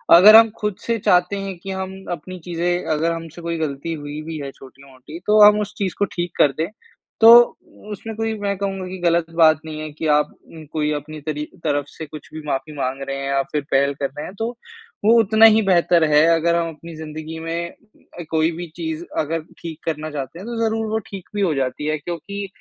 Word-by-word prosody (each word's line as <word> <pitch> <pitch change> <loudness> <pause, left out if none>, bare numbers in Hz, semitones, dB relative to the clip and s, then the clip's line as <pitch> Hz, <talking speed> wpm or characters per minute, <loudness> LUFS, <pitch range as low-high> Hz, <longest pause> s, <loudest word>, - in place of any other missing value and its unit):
अगर 205 +5 +9
हम 225 0 +8
खुद 210 -2 -1
से 230 -1 -1
चाहते 180 0 +3
हैं 195 -2 -5
कि 195 - -7
हम 190 0 -4 0.2
अपनी 175 +2 -6
चीज़ें 175 +1 -2
अगर 160 +2 0
हम 165 0 -5
से 175 - -9
कोई 170 0 -3
गलती 155 +1 -3
हुई 145 -1 -6
भी 160 +1 -6
है 140 - -6
छोटी-मोटी 135 +3 -13
तो 210 +1 +5
हम 210 0 +6
उस 205 0 -5
चीज़ 190 -4 -2
को 205 - +3
ठीक 175 0 -2
कर 145 - +5
दें 160 +1 0 0.5
तो, 225 +1 +10 0.6
उसमें 220 +2 -6
कोई 225 0 -1
मैं 200 -1 -1
कहूँगा 195 -1 -3
कि 185 +1 -6
गलत 170 -1 +2
बात 160 -2 +5
नहीं 155 -1 -6
है 155 0 -5
कि 155 +2 -4
आप 150 0 0 0.2
उम, 160 -1 -12
कोई 150 0 -2
अपनी 150 +1 -6
तरी 150 0 -3 0.2
तरफ 145 -2 0
से 160 - -9
कुछ 155 -1 -11
भी 155 - -6
माफ़ी 140 +2 -3
माँग 135 0 -2
रहे 135 0 -3
हैं 140 0 -4
या 140 0 +1
फिर 150 - 0
पहल 140 +1 +3
कर 140 - 0
रहे 150 - -4
हैं, - - -8
तो 225 +3 -2 0.6
वो 220 - +6
उतना 220 +1 +5
ही 220 0 +7
बेहतर 175 -3 +3
है 150 +1 +6
अगर 170 +1 +1
हम 170 -1 0
अपनी 165 +2 -11
ज़िन्दगी 155 +1 -7
में 170 +1 -4 0.6
कोई 160 0 +2
भी 175 0 -5
चीज़ 160 -1 -4 0.2
अगर 160 +2 -1 0.2
ठीक 165 -2 -7
करना 155 -1 -3
चाहते 140 +2 -6
हैं, 190 - -9
तो 235 -1 -4
ज़रूर 225 0 -1
वो 220 - +1
ठीक 195 -3 -9
भी 205 - 0
हो 180 -5 +2
जाती 135 +2 -2
है। 155 0 0
क्योंकि 175 +6 -6
165 Hz, 225 wpm, -21 LUFS, 150-190 Hz, 0.6 s, तो